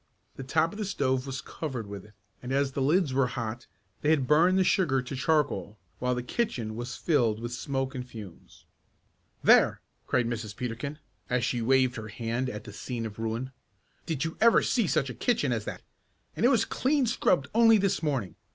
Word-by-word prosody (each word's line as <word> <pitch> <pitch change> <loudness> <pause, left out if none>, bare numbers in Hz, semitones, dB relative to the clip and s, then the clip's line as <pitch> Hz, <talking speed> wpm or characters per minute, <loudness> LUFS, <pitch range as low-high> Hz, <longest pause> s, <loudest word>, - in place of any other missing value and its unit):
The - - -7
top 155 +5 +1
of 210 - -9
the 210 - -1
stove 130 -7 0
was 135 0 -4
covered 135 -5 -5
with 100 -1 -8
it, 105 - -18 0.3
and 125 - -6
as 140 0 +1
the 135 - -3
lids 150 +1 +2
were 135 -1 +3
hot 120 -2 -5 0.3
they 150 - +1
had 150 -4 +3
burned 170 +7 +4
the 190 - +4
sugar 170 -8 +2
to 130 +2 -5
charcoal, 135 -6 0 0.2
while 125 0 0
the 125 - -3
kitchen 120 - -2
was 120 +2 -5
filled 120 -10 +1
with 120 +1 -5
smoke 135 +1 -2
and 125 - -4
fumes. 110 -8 -12 0.8
"There!" - - +5 0.3
cried 125 -2 +2
Mrs. 110 -3 -4
Peterkin, 125 +6 -4 0.3
as 125 -2 +1
she 120 - -1
waved 130 +1 +3
her 110 -1 -6
hand 115 +4 -2
at 105 -3 -6
the 105 - -10
scene 115 +1 -4
of 110 -1 -7
ruin. 115 +4 -3 0.6
"Did 160 -2 -1
you 160 - -4
ever 230 0 +6
see 230 -6 +1
such 140 -6 +1
a - - -7
kitchen 215 - 0
as 115 -3 -1
that? - - -6 0.5
And 235 - +3
it - - +5
was 250 -4 +3
clean 275 0 +1
scrubbed 180 - +1
only 225 0 +6
this 200 -2 +1
morning! 130 - -1
130 Hz, 200 wpm, -28 LUFS, 115-155 Hz, 0.8 s, ever